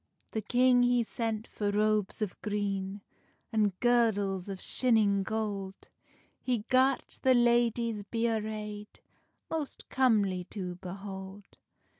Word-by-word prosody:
The 220 Hz, -, -2 dB
king 250 Hz, +3 st, +4 dB
he 245 Hz, -1 st, +3 dB
sent 225 Hz, -1 st, -3 dB
for 205 Hz, -1 st, -3 dB
robes 210 Hz, 0 st, +1 dB
of 200 Hz, -, -6 dB
green, 200 Hz, -1 st, -2 dB, 0.5 s
An 215 Hz, -2 st, +3 dB
girdles 205 Hz, -6 st, +2 dB
o 195 Hz, -, -3 dB
shinning 210 Hz, -1 st, +2 dB
gold; 200 Hz, -2 st, -4 dB, 0.5 s
He 245 Hz, -4 st, -1 dB
gart 260 Hz, +1 st, +2 dB
the 260 Hz, -1 st, +5 dB
ladies 235 Hz, -2 st, +2 dB
be 225 Hz, +3 st, -3 dB
arrayd 210 Hz, -2 st, -4 dB, 0.5 s
Most 315 Hz, -3 st, -4 dB
comely 205 Hz, -8 st, +2 dB
to 185 Hz, -2 st, -5 dB
behold. 190 Hz, +2 st, -9 dB
215 Hz, 115 wpm, -30 LUFS, 200-235 Hz, 0.5 s, the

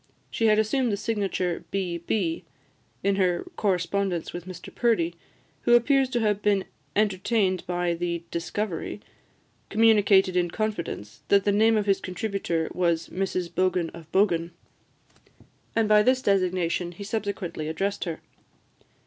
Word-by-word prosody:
She 225 Hz, -, +1 dB
had 215 Hz, -1 st, +5 dB
assumed 235 Hz, +3 st, +1 dB
the 200 Hz, -, 0 dB
signature, 195 Hz, -5 st, -1 dB
"B. 180 Hz, -3 st, -2 dB
B.," 220 Hz, -, -1 dB, 0.6 s
in 200 Hz, 0 st, +2 dB
her 180 Hz, -3 st, +1 dB
correspondence 190 Hz, -2 st, -1 dB
with 175 Hz, +1 st, -7 dB
Mr 180 Hz, -1 st, -9 dB
Purdie, 210 Hz, -9 st, +1 dB, 0.5 s
who 240 Hz, -, +5 dB
appears 265 Hz, +2 st, +3 dB
to 245 Hz, -, 0 dB
have 210 Hz, -2 st, +1 dB
been 200 Hz, -2 st, +2 dB, 0.3 s
entertained 200 Hz, -1 st, +1 dB
by 175 Hz, -1 st, 0 dB
the 170 Hz, 0 st, -3 dB
discovery, 180 Hz, +3 st, -3 dB, 0.7 s
communicated 205 Hz, -4 st, +4 dB
in 175 Hz, -1 st, +2 dB
confidence, 170 Hz, -, -4 dB
that 200 Hz, -1 st, +4 dB
the 205 Hz, -, +2 dB
name 220 Hz, +2 st, +4 dB
of 210 Hz, -, 0 dB
his 195 Hz, -2 st, +2 dB
contributor 185 Hz, -4 st, -2 dB
was 170 Hz, -2 st, 0 dB
"Mrs 185 Hz, -2 st, -2 dB
Bogan 180 Hz, -1 st, 0 dB
of 165 Hz, -1 st, -12 dB
Bogan;" 175 Hz, -4 st, +2 dB, 1.3 s
and 225 Hz, -1 st, +3 dB
by 210 Hz, 0 st, +6 dB
this 255 Hz, +3 st, +2 dB
designation 180 Hz, -2 st, +1 dB
he 200 Hz, -, -8 dB
subsequently 200 Hz, -7 st, -3 dB
addressed 195 Hz, +6 st, -2 dB
her. 165 Hz, -2 st, -5 dB
195 Hz, 140 wpm, -26 LUFS, 175-210 Hz, 1.3 s, by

